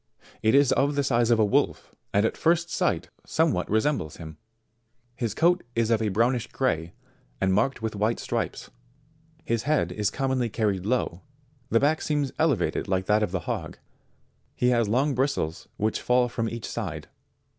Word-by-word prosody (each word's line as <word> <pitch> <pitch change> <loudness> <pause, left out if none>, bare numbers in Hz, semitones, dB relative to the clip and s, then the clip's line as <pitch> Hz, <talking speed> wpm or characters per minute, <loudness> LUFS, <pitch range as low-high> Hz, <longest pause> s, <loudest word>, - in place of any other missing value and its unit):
It 110 +3 +3
is 140 -2 +5
of 140 +1 +2
the 140 - +1
size 120 -3 +2
of 120 - +4
a 110 - +4
wolf, 100 - 0 0.2
and 100 +2 +3
at - - 0
first 170 0 +1
sight, - - 0
somewhat - - 0
resembles 110 - 0
him. 80 -2 -9 0.8
His 115 -4 -3
coat 175 +2 +3
is 115 0 +1
of 115 -1 +3
a 110 - +1
brownish 120 +4 +1
gray, 85 -11 -1 0.5
and 95 -1 +2
marked 115 +4 +1
with 110 -1 -2
white 110 +3 +1
stripes. - - -3 0.7
His 115 -1 0
head 145 - +2
is 105 +2 0
commonly 130 -3 -1
carried 100 -4 -1
low; 110 -7 -1 0.5
the 115 - +4
back 150 +4 +2
seems 145 -3 -1
elevated - - +1
like 95 -1 0
that 105 +2 +3
of 105 - +1
the 95 -2 -2
hog; - - -4 0.8
he 125 - +2
has 115 -4 +2
long 135 +6 +2
bristles 125 - -1
which 110 +1 -1
fall 125 0 +3
from 115 -1 -2
each 115 -1 -6
side. - - -5
115 Hz, 175 wpm, -26 LUFS, 105-135 Hz, 0.8 s, is